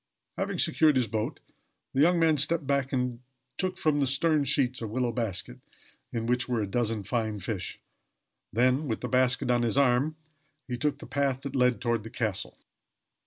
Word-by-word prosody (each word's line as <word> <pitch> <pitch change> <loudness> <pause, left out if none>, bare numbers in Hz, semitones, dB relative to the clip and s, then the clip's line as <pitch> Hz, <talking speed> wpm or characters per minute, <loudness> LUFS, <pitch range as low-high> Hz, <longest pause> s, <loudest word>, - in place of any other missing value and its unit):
Having - - -2
secured 150 +2 +3
his 125 -2 +3
boat, 110 0 -3 0.5
the 135 - +2
young 175 +3 +5
man 165 -2 +4
stepped 150 +2 +3
back 140 -1 0
and 125 -2 -1 0.4
took 185 -1 -1
from 150 -2 +1
the 140 - +2
stern 145 +2 +2
sheets 130 -2 +2
a 115 - -3
willow 120 +2 -1
basket, 100 - -3 0.5
in 115 -1 -3
which 125 +2 0
were 120 -2 0
a 105 - 0
dozen 110 0 -1
fine 110 0 -2
fish; 100 0 -5 0.7
and - - -12
then, 130 +5 +3
with 110 - -2
the 125 - -3
basket 125 0 +3
on 120 -1 +2
his 120 +2 0
arm, 140 +3 +3 0.5
he 125 - -3
took 145 +4 -1
the - - -11
path 135 -2 -1
that 140 -1 -5
led 125 -2 +3
toward 120 -2 0
the 115 - -9
castle. 110 -4 -3
125 Hz, 190 wpm, -28 LUFS, 115-140 Hz, 0.7 s, young